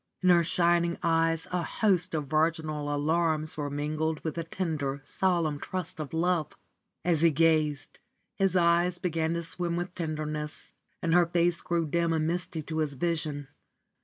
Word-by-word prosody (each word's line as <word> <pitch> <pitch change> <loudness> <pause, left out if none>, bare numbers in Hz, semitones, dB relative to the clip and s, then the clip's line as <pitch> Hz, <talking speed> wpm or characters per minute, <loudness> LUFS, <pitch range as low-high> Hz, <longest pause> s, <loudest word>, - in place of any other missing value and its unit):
In 185 - +4
her 175 -1 +6
shining 170 0 +2
eyes 165 -1 +2
a 180 -1 0
host 180 -2 +1
of 150 -2 -1
virginal 155 0 0
alarms 155 +1 +1
were 145 -1 -3
mingled 155 +2 -2
with 160 - -2
the 165 - -3
tender, 155 -5 -3
solemn 170 -4 0
trust 185 -1 -5
of 150 -3 -5
love. 165 -2 0 0.5
As 165 -3 +2
he 165 - +6
gazed, 155 -2 +1 0.3
his 195 -2 +1
eyes 175 0 +3
began 165 -2 -1
to 170 - -2
swim 170 +1 -2
with 175 +1 -3
tenderness, 155 -3 -4 0.3
and 165 - +1
her 175 -1 +5
face 170 0 +1
grew 170 -1 0
dim 170 +2 +1
and 155 -1 +1
misty 170 -1 -2
to 160 +1 -4
his 150 -2 -1
vision. 150 -2 -2
165 Hz, 160 wpm, -28 LUFS, 155-175 Hz, 0.5 s, her